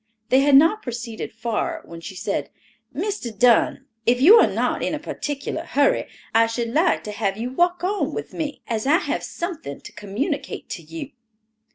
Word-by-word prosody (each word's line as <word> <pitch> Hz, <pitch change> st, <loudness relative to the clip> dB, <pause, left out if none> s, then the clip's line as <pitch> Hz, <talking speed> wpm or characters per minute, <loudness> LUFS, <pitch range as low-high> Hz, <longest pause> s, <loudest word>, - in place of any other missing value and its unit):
They 260 Hz, -, +5 dB
had 280 Hz, 0 st, +5 dB
not 325 Hz, +10 st, +6 dB
proceeded 235 Hz, -2 st, -5 dB
far 225 Hz, -1 st, -3 dB
when 170 Hz, 0 st, -10 dB
she 190 Hz, -, -8 dB
said, 185 Hz, -, -2 dB, 0.4 s
"Mr. 410 Hz, -, -3 dB
Dunn, 240 Hz, +1 st, +4 dB, 0.2 s
if 245 Hz, +1 st, +4 dB
you 370 Hz, -, +9 dB
are -, -, +6 dB
not -, -, -1 dB
in -, -, -1 dB
a -, -, -5 dB
particular 285 Hz, -1 st, -4 dB
hurry, 280 Hz, +1 st, +2 dB, 0.3 s
I 230 Hz, 0 st, +5 dB
should 230 Hz, 0 st, -2 dB
like 330 Hz, +5 st, +2 dB
to 210 Hz, -, -5 dB
have 205 Hz, -2 st, -1 dB
you 240 Hz, +3 st, -3 dB
walk 350 Hz, +5 st, +1 dB
on 400 Hz, +2 st, 0 dB
with -, -, -6 dB
me, 295 Hz, -2 st, -4 dB
as 225 Hz, +1 st, -2 dB
I 310 Hz, +4 st, +6 dB
have 385 Hz, -, -2 dB
something 335 Hz, -, -5 dB
to -, -, -11 dB
communicate 270 Hz, -, -4 dB
to 175 Hz, -, -5 dB
you." 165 Hz, -, -8 dB
250 Hz, 185 wpm, -23 LUFS, 220-310 Hz, 0.4 s, you